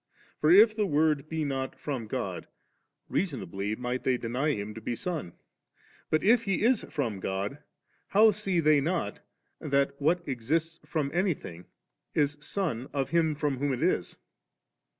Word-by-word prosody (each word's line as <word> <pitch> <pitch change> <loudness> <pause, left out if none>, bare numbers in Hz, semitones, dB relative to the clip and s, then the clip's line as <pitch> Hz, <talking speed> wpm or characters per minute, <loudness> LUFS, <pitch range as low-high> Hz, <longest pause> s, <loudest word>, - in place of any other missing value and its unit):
For 150 - +3
if 215 +5 +7
the 210 -2 +1
Word 150 -1 +2
be 160 -1 -1
not 135 -1 -3
from 130 -7 -4
God, - - -4 0.6
reasonably 105 - -2
might 125 +2 -3
they 130 -1 +2
deny 125 +6 -1
Him 105 -1 -4
to 110 - -9
be 120 - -2
Son; 155 - -4 0.8
but 155 - +2
if 230 +3 +4
He 195 0 0
is 240 -1 +3
from 120 -10 -2
God, 100 +8 -3 0.5
how 215 +2 +6
see 195 -3 0
they 155 -2 +4
not 160 - -1 0.4
that 140 0 +1
what 170 +4 +1
exists 155 +6 -1
from 150 -4 -1
anything 165 - -2 0.5
is 145 -1 +2
son 145 - -2
of 135 -1 -1
him 165 -2 +2
from 145 -3 -1
whom 145 0 0
it 125 - -2
is? - - 0
145 Hz, 155 wpm, -29 LUFS, 125-170 Hz, 0.8 s, if